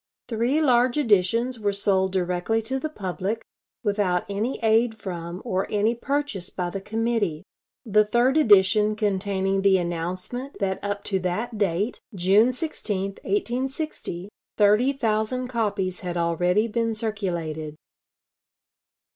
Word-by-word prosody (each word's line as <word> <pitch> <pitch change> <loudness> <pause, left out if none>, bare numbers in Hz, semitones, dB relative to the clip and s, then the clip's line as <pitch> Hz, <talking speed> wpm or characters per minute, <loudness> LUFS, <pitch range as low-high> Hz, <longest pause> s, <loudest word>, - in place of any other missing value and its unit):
Three 240 +6 +1
large 250 -1 +3
editions 230 0 +2
were 205 -1 0
sold 190 -1 +2
directly 180 +4 0
to 265 +4 -2
the 310 - -3
public, 200 - -3 0.4
without 200 -4 +1
any 210 +6 -2
aid 225 +1 +3
from 175 -2 -6
or 190 -5 -1
any 210 +2 +2
purchase 260 -6 -2
by 175 -1 -3
the 195 - -4
committee 215 -6 -1 0.4
the 215 -1 +4
third 240 +5 +2
edition 210 -5 +5
containing 195 -2 0
the 195 -1 +5
announcement 180 - -4
that 190 -2 -2
up 205 0 -3
to 195 -2 -1
that 210 +5 -3
date, 200 +3 0
June 195 +7 +4
16, 250 - -3 0.2
1860, 265 - -3 0.3
thirty 210 +6 +4
thousand 250 -1 -1
copies 205 -6 -1
had 175 -1 -4
already 180 +5 +2
been 230 0 -1
circulated. 170 -8 -3
210 Hz, 125 wpm, -25 LUFS, 185-235 Hz, 0.4 s, edition